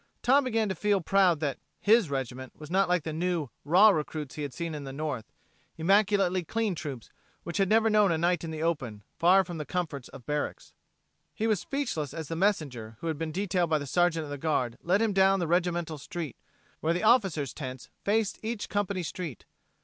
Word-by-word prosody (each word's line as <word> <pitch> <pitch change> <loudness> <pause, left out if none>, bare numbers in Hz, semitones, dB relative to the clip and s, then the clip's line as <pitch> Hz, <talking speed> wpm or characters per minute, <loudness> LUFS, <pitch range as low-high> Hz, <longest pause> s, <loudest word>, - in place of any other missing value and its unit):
Tom 270 +3 +4
began 225 -3 +1
to 190 - -1
feel 205 0 +1
proud 185 -2 +3
that 145 -3 -1 0.2
"his" 215 -4 +4
regiment 130 -1 -4
was 155 +1 -10
not 195 0 +3
like 180 -3 +2
the 160 - -4
new, 170 -3 -1
raw 185 +8 +7
troops 150 -2 -6
he 150 - -6
had 145 -2 -3
seen 165 +5 -4
in 150 -1 -5
the 135 - -6
north 140 -5 -4 0.5
immaculately 195 +1 +3
clean 220 +3 -1
troops 140 -8 -7 0.3
which 170 -1 -4
had 195 -1 +2
never 225 +1 +4
known 210 -3 +4
a 165 - +1
night 170 0 +1
in 165 - -4
the 160 0 -4
open, 125 -11 -2 0.2
far 185 +3 +6
from 175 -3 -7
the - - -2
comforts 155 -6 -4
of 125 - -12
barracks. 150 +1 -3 0.6
He 220 - -1
was 215 -4 +2
speechless 165 - -3
as 160 -3 -5
the 165 - -2
messenger 140 - -1
who - - -6
had 155 -2 -3
been 160 -1 -2
detailed 180 -1 0
by 155 - +3
the 145 - -4
Sergeant 165 +2 +2
of 145 - -8
the 145 - -5
Guard 130 -6 0
led 190 +6 +2
him 220 -2 +1
down 195 0 +4
the 175 - 0
regimental 170 -2 0
street, 160 +1 -5 0.4
where 165 +2 +1
the 180 - -2
officers' 195 - +3
tents 130 -3 -7 0.2
faced 215 0 +1
each 225 -1 -4
company 200 -2 -1
street. 165 -4 -6
170 Hz, 210 wpm, -28 LUFS, 150-195 Hz, 0.6 s, raw